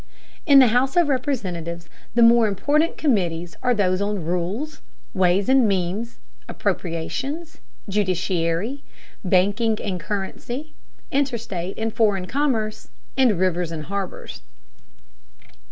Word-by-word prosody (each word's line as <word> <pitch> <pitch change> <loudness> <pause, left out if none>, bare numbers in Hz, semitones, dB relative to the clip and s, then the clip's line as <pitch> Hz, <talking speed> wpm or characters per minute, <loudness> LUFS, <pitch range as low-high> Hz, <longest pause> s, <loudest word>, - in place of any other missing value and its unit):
In 280 -2 +8
the 260 -3 +8
House 255 +4 +2
of 340 -4 +4
Representatives 180 - -2 0.3
the 235 - +6
more 230 -1 +6
important 290 - +1
committees 175 - 0
are 250 -1 +2
those 185 -2 +1
on 200 -4 -2
rules, 185 - -3 0.3
ways 185 0 +2
and 260 -3 +5
means, 195 +4 -2 0.3
appropriations, 265 - -3 0.3
judiciary, 185 +3 -1 0.4
banking 205 +4 +2
and 185 -3 -3
currency, 210 - -5 0.4
interstate 230 -10 -2
and 225 0 -2
foreign 205 -5 +2
commerce, 230 -3 -1 0.3
and 250 -8 +3
rivers 175 -2 0
and 155 -2 -5
harbors. 195 0 -5
205 Hz, 110 wpm, -23 LUFS, 180-250 Hz, 0.4 s, In